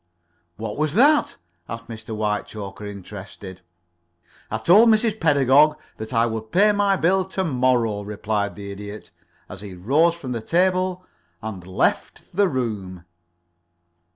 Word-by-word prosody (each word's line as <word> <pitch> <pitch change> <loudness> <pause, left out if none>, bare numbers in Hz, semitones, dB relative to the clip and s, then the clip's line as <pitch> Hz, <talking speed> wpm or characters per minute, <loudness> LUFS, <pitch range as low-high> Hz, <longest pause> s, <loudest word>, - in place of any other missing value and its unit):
"What 105 0 -5
was 150 +1 -1
that?" 290 +6 +4 0.3
asked 115 +1 -7
Mr. 110 0 -7
Whitechoker, 105 -1 -4
interested. 95 -1 -10 0.9
"I 110 - -2
told 195 - +6
Mrs. 220 0 +2
Pedagog 145 0 +4 0.2
that 110 0 -7
I 115 -1 +3
would 110 -1 -5
pay 210 +3 +5
my 205 -1 +2
bill 190 +2 +2
to 190 0 -3
morrow," 125 - +1
replied 105 0 -3
the 100 -1 -8
Idiot, 105 +1 -9 0.4
as 95 - -9
he 100 -3 -9
rose 145 - +2
from 135 -7 -7
the 115 -2 -3
table 185 +5 0 0.3
and 95 -4 -7
left 95 - -1
the 200 +1 +4
room. 105 - -4
115 Hz, 135 wpm, -22 LUFS, 105-175 Hz, 0.9 s, told